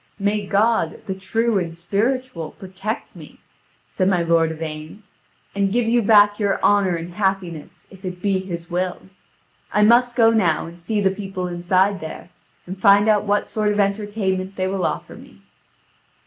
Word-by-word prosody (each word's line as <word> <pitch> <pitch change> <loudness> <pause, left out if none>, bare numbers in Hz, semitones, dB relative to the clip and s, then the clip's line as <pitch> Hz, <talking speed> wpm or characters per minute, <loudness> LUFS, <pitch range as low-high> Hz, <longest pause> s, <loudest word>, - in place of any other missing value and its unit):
"May 205 0 -1
God, 220 +4 +1
the 195 - -3
true 225 +3 0
and 170 -2 -3
spiritual, 200 - -2
protect 190 +3 -6
me," - - -13 0.5
said 185 -1 +1
my 180 -3 +2
lord 165 -1 +3
Yvain, 155 +4 -7 0.5
"and 200 -1 0
give 240 +2 +1
you 235 +1 +3
back 205 -1 +5
your 200 -2 +1
honour 200 -3 +3
and 170 +1 -6
happiness, 185 -5 -3
if 190 0 -15
it 180 -1 -5
be 195 0 0
His 175 -3 -6
will. 180 +1 -3 0.7
I 210 - +3
must 240 +2 +4
go 225 -2 +5
now 180 -9 +1
and 170 +1 -11
see 210 +4 -2
the 190 -1 +3
people 190 -2 -5
inside 185 +3 +1
there, 160 +2 -8 0.3
and 185 +1 -8
find 200 +2 +6
out 210 -1 +3
what 205 0 +1
sort 210 -1 0
of 210 - -1
entertainment 200 -2 -1
they 185 - -1
will 190 -1 0
offer - - -5
me." - - -16
195 Hz, 170 wpm, -21 LUFS, 180-210 Hz, 0.7 s, find